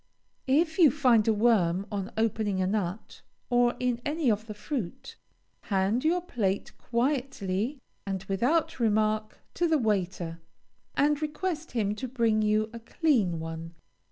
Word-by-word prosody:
If 320 Hz, +5 st, +2 dB
you 325 Hz, -4 st, +8 dB
find 250 Hz, -6 st, +3 dB
a -, -, +5 dB
worm 200 Hz, -5 st, +2 dB
on 200 Hz, +1 st, -3 dB
opening 220 Hz, -3 st, 0 dB
a 185 Hz, -, +2 dB
nut, 195 Hz, 0 st, -3 dB, 0.3 s
or 245 Hz, 0 st, +3 dB
in 245 Hz, -1 st, 0 dB
any 295 Hz, -4 st, +1 dB
of 215 Hz, +1 st, -2 dB
the 215 Hz, -, -6 dB
fruit, 210 Hz, -, -5 dB, 0.5 s
hand 200 Hz, +4 st, +1 dB
your 345 Hz, +3 st, +2 dB
plate 205 Hz, -, -2 dB
quietly, 245 Hz, -2 st, -1 dB, 0.3 s
and 195 Hz, -2 st, -4 dB
without 245 Hz, -, 0 dB
remark, 215 Hz, -1 st, +1 dB, 0.2 s
to 345 Hz, -, +1 dB
the 320 Hz, -1 st, +3 dB
waiter, 185 Hz, -, -1 dB, 0.6 s
and 295 Hz, +1 st, +3 dB
request 310 Hz, +1 st, -3 dB
him 210 Hz, -4 st, 0 dB
to 260 Hz, -, -4 dB
bring 230 Hz, -3 st, +1 dB
you 215 Hz, +1 st, +1 dB
a 230 Hz, -, -6 dB
clean 225 Hz, -, +1 dB
one. 165 Hz, +1 st, -6 dB
225 Hz, 145 wpm, -28 LUFS, 200-270 Hz, 0.6 s, you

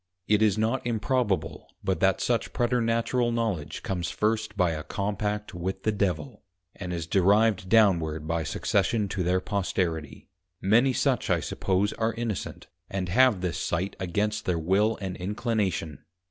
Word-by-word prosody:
It 105 Hz, 0 st, +3 dB
is 105 Hz, -2 st, +3 dB
not 115 Hz, +4 st, 0 dB
improbable 105 Hz, -, -1 dB, 0.2 s
but -, -, 0 dB
that -, -, +2 dB
such -, -, 0 dB
Preternatural 120 Hz, 0 st, +1 dB
Knowledge 110 Hz, -10 st, -2 dB
comes 90 Hz, -2 st, -2 dB
first 110 Hz, -1 st, -1 dB
by 90 Hz, -3 st, +3 dB
a 80 Hz, -1 st, -3 dB
Compact 105 Hz, +3 st, -3 dB
with 90 Hz, +2 st, -4 dB
the 110 Hz, -, +2 dB
Devil, 105 Hz, +4 st, -2 dB, 0.3 s
and 90 Hz, -2 st, -6 dB
is 85 Hz, -2 st, -3 dB
derived 100 Hz, +2 st, +3 dB
downward 85 Hz, -8 st, +3 dB
by 85 Hz, 0 st, 0 dB
Succession 105 Hz, +6 st, 0 dB
to 95 Hz, -, -2 dB
their 90 Hz, +1 st, +2 dB
Posterity: 90 Hz, -6 st, -2 dB, 0.3 s
Many 115 Hz, +7 st, +4 dB
such 125 Hz, -, 0 dB
I -, -, +3 dB
suppose 95 Hz, +2 st, 0 dB
are 110 Hz, 0 st, -1 dB
Innocent, 115 Hz, -4 st, -4 dB, 0.2 s
and 95 Hz, -2 st, -3 dB
have 115 Hz, 0 st, +4 dB
this 90 Hz, -2 st, -2 dB
sight 90 Hz, +3 st, -2 dB
against 105 Hz, +4 st, -1 dB
their 90 Hz, -2 st, +1 dB
Will 100 Hz, +7 st, +2 dB
and 95 Hz, -2 st, -4 dB
Inclination.' 100 Hz, -, -2 dB
100 Hz, 150 wpm, -27 LUFS, 90-110 Hz, 0.3 s, Many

